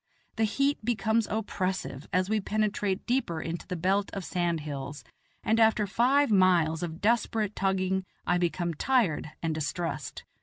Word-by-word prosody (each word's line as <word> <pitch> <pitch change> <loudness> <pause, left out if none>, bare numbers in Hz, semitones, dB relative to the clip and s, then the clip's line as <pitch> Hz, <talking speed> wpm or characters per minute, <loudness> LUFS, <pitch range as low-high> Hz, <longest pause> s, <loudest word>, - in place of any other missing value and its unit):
The 225 - +3
heat 275 +4 0
becomes 220 -1 +1
oppressive 190 -9 -3
as 185 +1 +2
we 215 +1 +1
penetrate 205 -2 -1
deeper 235 -10 0
into 165 +1 -5
the 180 - -3
belt 190 +4 +1
of 195 -3 -4
sand 175 -3 -1
hills, 145 -1 -6 0.4
and 225 +1 +2
after 220 -1 +4
five 250 +6 +3
miles 175 -5 +4
of 165 -1 -5
desperate 220 -1 +1
tugging 190 0 0 0.2
I 180 - +2
become 175 0 0
tired 190 - +1
and 165 -1 0
distressed. 155 +3 -3
190 Hz, 150 wpm, -28 LUFS, 170-220 Hz, 0.4 s, after